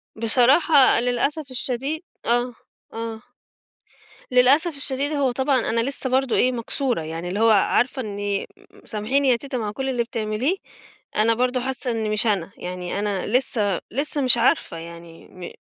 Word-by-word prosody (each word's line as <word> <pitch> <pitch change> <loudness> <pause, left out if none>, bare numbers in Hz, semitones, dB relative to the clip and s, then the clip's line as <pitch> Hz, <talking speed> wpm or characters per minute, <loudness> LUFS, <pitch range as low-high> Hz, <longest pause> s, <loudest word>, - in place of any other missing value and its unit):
بصراحة 260 +6 +4
للأسف 260 +4 -1
الشديد 260 +5 -3 0.2
آه، 240 +1 +1 0.4
آه 225 -1 -5 1.1
للأسف 280 +6 +4
الشديد، 280 +1 -2
هو 280 -3 +1
طبعًا 265 +1 +1
أنا 230 +1 +1
لسّه 265 +1 0
برضه 260 -1 +1
إيه، 255 - +3
مكسورة، 245 - -1
يعني 165 +2 -5
اللي 190 +4 -3
هو 225 +1 +5
عارفة 245 +5 +2
إني 205 -2 -3
أ - - -8 0.4
أ - - -22
سامحيني 260 +6 0
يا 245 - +5
تيتة 260 +2 -5
مع 215 -3 -3
كل 265 +5 -3
اللي 245 -2 0
بتعمليه، 230 - -1 0.6
أنا 225 +2 +3
برضه 250 +1 0
حاسّة 260 -1 -3
إني 220 -2 -2
مش 215 +2 0
أنا. 195 -4 0
يعني 180 +1 -5
أنا 205 -2 -2
لسّه 210 -5 +1
لسّه 290 +4 0
مش 255 -2 +5
عارفة 235 - +1
يعني 170 0 -11
م 180 -1 -9
240 Hz, 160 wpm, -23 LUFS, 210-265 Hz, 1.1 s, هو